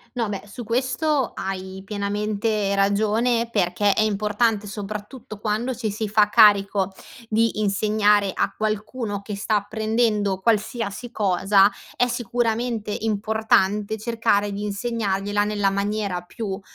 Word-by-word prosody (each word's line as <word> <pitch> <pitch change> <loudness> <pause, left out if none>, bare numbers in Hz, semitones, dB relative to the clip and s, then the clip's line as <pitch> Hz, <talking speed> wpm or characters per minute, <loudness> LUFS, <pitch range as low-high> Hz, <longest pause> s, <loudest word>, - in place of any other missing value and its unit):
No, 230 -3 -1
beh, 200 -1 -4
su 220 +4 -8
questo 260 +4 0
hai 190 0 -5
pienamente 205 0 -1
ragione, 220 +4 +1
perché 200 0 +2
è - - +1
importante, 210 +1 +1
soprattutto 210 +3 -7
quando 220 +5 -1
ci 220 -2 -2
si 215 +1 -3
fa 210 0 +4
carico 200 -3 +5 0.4
di 225 0 +1
insegnare 205 0 +2
a - - -1
qualcuno 215 0 -3
che 205 0 -6
sta 205 0 0
prendendo 215 -3 0
qualsiasi 225 +2 -1
cosa, 195 -1 +3 0.3
è 245 - +2
sicuramente 235 -2 -1
importante 215 -1 +1
cercare 215 -2 0
di 200 +1 -4
insegnargliela 205 -2 -1
nella 205 -1 +1
maniera 200 -2 -2
più 195 +1 -5
210 Hz, 120 wpm, -23 LUFS, 200-225 Hz, 0.4 s, carico